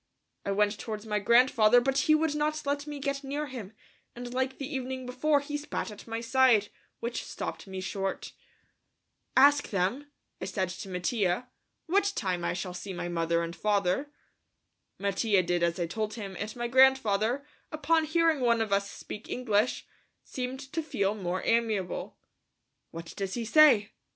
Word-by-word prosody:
I 200 - -2
went 210 +1 +1
towards 215 -1 -5
my 210 -1 0
grandfather, 235 +1 +5
but 265 +2 0
he 310 +3 +4
would 310 -1 +1
not 300 0 -1
let 285 +1 -1
me 295 -1 -5
get 280 0 -3
near 285 +2 -3
him, 245 -8 -8 0.4
and 245 0 -7
like 260 +1 -1
the 275 - -4
evening 260 -2 -4
before, 280 +4 +1
he 295 +1 -4
spat 295 -6 -4
at 210 - -12
my 225 0 -3
side, 235 -3 +4 0.3
which 235 +1 -3
stopped - - -6
me 190 -1 -5
short. 195 0 -4 1.0
"Ask 285 +2 +6
them," 210 +10 -1 0.3
I - - -2
said 190 -1 -2
to 185 +2 -7
Mattia, 185 +4 -1 0.4
"what 400 +3 +2
time 185 -5 -1
I - - 0
shall 180 0 -4
see 190 +2 -6
my 175 0 -4
mother 170 0 0
and 170 0 -5
father?" 205 +6 0 0.9
Mattia 200 0 +1
did 175 0 0
as 170 +1 +1
I 175 - +1
told 215 +5 -3
him, 200 -4 -6
and 215 0 -4
my 240 0 -2
grandfather, 260 -1 +3 0.3
upon 315 +1 +2
hearing 325 -1 +2
one 235 -2 +3
of 220 -3 0
us 200 0 +1
speak 210 - -9
English, 225 -2 0 0.4
seemed 255 +1 -5
to 325 - 0
feel 200 -10 -1
more 185 -3 -3
amiable. 220 -6 0 0.7
"What 165 0 -8
does 195 -1 -3
he 235 -1 -3
say?" 235 -5 +6
230 Hz, 170 wpm, -29 LUFS, 195-275 Hz, 1.0 s, Ask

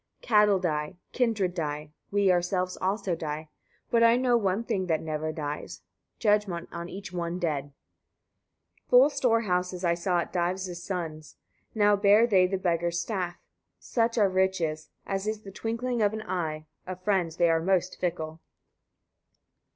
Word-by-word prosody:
77. - - -14
Cattle 210 -2 +6
die, 155 -1 -2 0.2
kindred 220 -7 +1
die, 150 -3 -4 0.2
we 200 -1 +3
ourselves 180 +1 0
also 190 0 -1
die; 155 -1 -4 0.4
but 235 - +4
I 230 0 +6
know 250 -1 +3
one 200 -1 +1
thing 190 -5 -2
that 160 -2 +1
never 155 0 -3
dies, 150 -1 -6 0.3
judgment 205 -6 +1
on 170 0 -6
each 195 -1 -8
one 170 0 -2
dead. 155 -6 -1 1.2
78. - - -45
Full 255 +3 +7
storehouses 200 -9 0
I 170 - +3
saw 175 +1 0
at 170 - -7
Dives' 180 0 -2
sons': 160 -5 -5 0.4
now 205 -1 +4
bear 205 +3 +5
they 190 -5 +4
the 195 +1 -1
beggar's 170 -2 0
staff. 180 -3 -3 0.4
Such 230 0 0
are 210 -3 +5
riches; 185 -5 0 0.2
as 195 +1 -3
is 215 0 -3
the 195 - -9
twinkling 230 +3 -2
of 205 0 +3
an 220 0 -4
eye: 155 -5 -3 0.2
of 185 0 -7
friends 185 -5 +1
they 170 -1 +4
are 165 0 +2
most 185 +1 0
fickle. 160 -3 -3
185 Hz, 160 wpm, -28 LUFS, 170-205 Hz, 1.2 s, Full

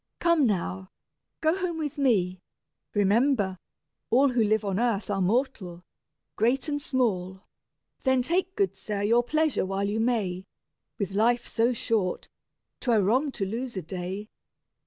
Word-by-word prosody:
Come 335 -6 +3
now, 190 -1 -2 0.5
go 315 +2 +3
home 360 -3 -2
with 295 -3 -4
me: 185 -9 +2 0.5
remember, 205 -1 +2 0.5
all 270 +4 +4
Who 245 -3 +2
live 215 0 +1
on 195 0 -1
earth 225 -4 0
are 195 -1 0
mortal, 185 -4 -1 0.5
great 250 +6 +1
and 290 -1 -1
small: 190 -9 -1 0.6
Then 260 -2 +2
take, 370 +6 0
good 395 -2 +1
sir, 205 -1 -4
your 230 +3 +4
pleasure 310 +4 +1
while 195 +1 -1
you 210 +2 -1
may; 205 -6 -1 0.5
With 200 -2 -2
life 235 +4 +2
so 230 +2 +2
short, 215 -6 -1 0.5
'twere 230 -5 +2
wrong 260 +9 +2
to 195 - -2
lose 235 +3 -4
a 185 - -3
day." 185 +5 -5
225 Hz, 145 wpm, -27 LUFS, 195-260 Hz, 0.6 s, all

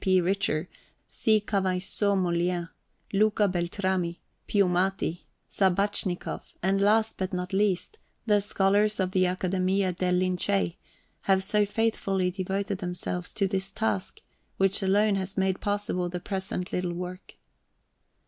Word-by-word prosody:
P. 185 -1 +4
Richter, 180 -3 0 0.4
C. 220 -1 +2
Kavaisson 195 0 0
Mollien, 175 -1 0 0.4
Luca 210 +1 +3
Beltrami, 180 -1 -1 0.3
Piumati, 185 -2 +1 0.2
Sabachnikoff, 190 -1 0
and, 195 +1 +2
last 220 +2 +3
but 190 -1 -2
not 180 +1 -3
least, 200 - 0 0.3
the 210 -2 +4
scholars 205 +1 +2
of 185 -1 0
the 185 -1 +3
Academia 185 +1 0
del 180 0 0
Lincei, 180 - 0 0.5
have 190 -1 +4
so 205 +1 +2
faithfully 195 -4 0
devoted 195 +1 -2
themselves 180 -1 -3
to 195 - 0
this 190 +1 -1
task, 110 - -2 0.4
which 195 +2 +2
alone 205 +2 +3
has 190 +1 -3
made 190 -1 +1
possible 205 -3 -1
the 180 0 -4
present 190 0 -3
little 180 -1 -1
work. 180 +1 -7
190 Hz, 125 wpm, -27 LUFS, 180-200 Hz, 0.5 s, P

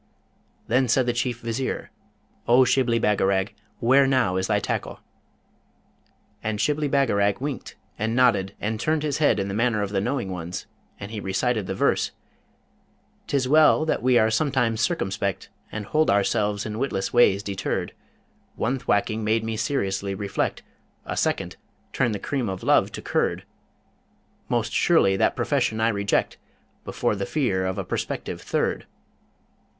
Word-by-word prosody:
Then 125 +2 +2
said 125 +2 +3
the 120 - 0
Chief 120 0 -2
Vizier, 115 +3 -3 0.6
'O 125 +2 +6
Shibli 120 -2 +2
Bagarag, 100 -2 +1 0.3
where 135 +3 +4
now 130 -8 +2
is 95 0 0
thy 105 -1 +2
tackle?' - - -3 1.4
And 110 -1 -3
Shibli 150 +3 +1
Bagarag 100 -8 +2
winked 140 -3 -5 0.2
and 110 +2 -1
nodded 100 -6 +3
and 110 +1 -2
turned 155 +4 0
his 145 -2 -1
head 145 -9 +3
in 95 - -1
the 100 - -4
manner 110 -1 +1
of 100 - -4
the 95 -2 0
knowing 120 -3 -2
ones, 90 0 -5 0.3
and 100 +1 -7
he 110 - -4
recited 105 +2 -1
the - - -3
verse: - - +1 1.2
'Tis 135 -2 0
well 155 +2 +5
that 160 - 0
we 125 0 +4
are 110 -1 +3
sometimes 120 -3 +1
circumspect, 100 - -1 0.2
And 110 -1 -5
hold 155 +7 +1
ourselves 105 +1 +1
in 110 0 -4
witless 125 -8 -2
ways 100 -5 +4
deterred: 95 -1 -3 0.6
One 130 +4 -1
thwacking 110 -2 0
made 110 +1 +1
me 115 0 -3
seriously 100 -5 -1
reflect; 100 0 -2 0.4
A - - -4
SECOND - - -1 0.4
turned 120 -5 +1
the - - -4
cream 130 0 -2
of 95 -1 -5
love - - +3
to - - -7
curd: - - 0 1.1
Most - - 0
surely 95 0 +4
that - - +2
profession 110 - 0
I 115 +1 +3
reject 100 -2 0 0.5
Before - - -1
the 100 -1 -3
fear 95 -11 0
of 95 +1 -3
a 100 - -2
prospective - - -4
THIRD. - - -1
110 Hz, 155 wpm, -24 LUFS, 100-130 Hz, 1.4 s, O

